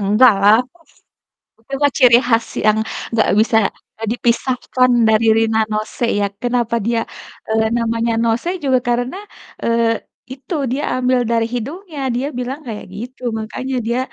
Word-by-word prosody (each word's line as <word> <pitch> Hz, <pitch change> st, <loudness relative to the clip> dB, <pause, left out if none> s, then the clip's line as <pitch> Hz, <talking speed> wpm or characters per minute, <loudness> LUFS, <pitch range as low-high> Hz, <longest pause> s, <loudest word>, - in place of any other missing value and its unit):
Enggaklah 205 Hz, 0 st, +5 dB
huf 335 Hz, +5 st, -28 dB, 0.9 s
itu 275 Hz, -, -8 dB
mah 285 Hz, -1 st, +4 dB
ciri 240 Hz, -2 st, +7 dB
khas 230 Hz, -1 st, +2 dB, 0.2 s
yang 215 Hz, 0 st, +4 dB, 0.4 s
gak 220 Hz, -, +3 dB
bisa, 225 Hz, 0 st, +3 dB, 0.4 s
eee, 225 Hz, -, -4 dB
dipisahkan 255 Hz, +1 st, +1 dB, 0.2 s
dari 220 Hz, +1 st, +3 dB
Rina 225 Hz, 0 st, +2 dB
Nose 215 Hz, +3 st, -2 dB
ya. 200 Hz, -, +1 dB, 0.2 s
Kenapa 240 Hz, -2 st, 0 dB
dia, 230 Hz, +2 st, 0 dB, 0.5 s
eee, 220 Hz, 0 st, +2 dB
namanya 230 Hz, 0 st, 0 dB
Nose 230 Hz, +9 st, 0 dB
juga 260 Hz, -2 st, +3 dB
karena, 245 Hz, +8 st, -1 dB, 0.5 s
eee, 230 Hz, -1 st, +1 dB, 0.3 s
itu 275 Hz, +7 st, -6 dB, 0.2 s
dia 280 Hz, +3 st, -2 dB
ambil 255 Hz, 0 st, +2 dB
dari 230 Hz, 0 st, +1 dB
hidungnya, 295 Hz, -, -5 dB
dia 265 Hz, +3 st, -1 dB
bilang 260 Hz, +4 st, -4 dB
kayak 215 Hz, -2 st, -6 dB
gitu. 250 Hz, +4 st, -8 dB, 0.2 s
Makanya 255 Hz, +4 st, -4 dB
dia 240 Hz, +2 st, 0 dB
235 Hz, 145 wpm, -18 LUFS, 225-255 Hz, 0.9 s, ciri